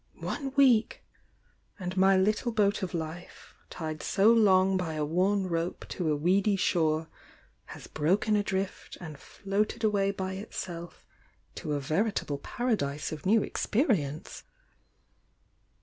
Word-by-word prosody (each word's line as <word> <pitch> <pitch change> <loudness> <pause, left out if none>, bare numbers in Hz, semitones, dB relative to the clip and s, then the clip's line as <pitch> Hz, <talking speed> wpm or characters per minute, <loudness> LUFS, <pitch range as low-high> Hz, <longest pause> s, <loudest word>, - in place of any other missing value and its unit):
One 275 -2 -3
week!— 255 -6 +3 0.7
and 185 -2 -5
my 190 0 +5
little 215 +5 +1
boat 205 -1 +1
of 185 -2 -3
life, 165 +2 -7 0.2
tied 155 -2 -5
so 210 +4 +4
long 190 -4 +4
by 170 -4 -2
a 150 -1 -1
worn 190 +5 +1
rope 170 -1 -3
to 165 -4 -1
a - - +2
weedy 190 +7 +2
shore, 160 -4 +1 0.6
has - - -10
broken 195 +8 +1
adrift 195 -2 -2
and 160 -4 -8
floated 205 +3 -3
away 200 -2 +2
by 190 -1 -3
itself 175 -4 -7 0.5
to 150 - -4
a 145 - 0
veritable 155 0 -1
paradise 150 - -2
of 155 +3 -5
new 215 +1 +4
experience. 175 - -1
190 Hz, 130 wpm, -29 LUFS, 160-205 Hz, 0.7 s, my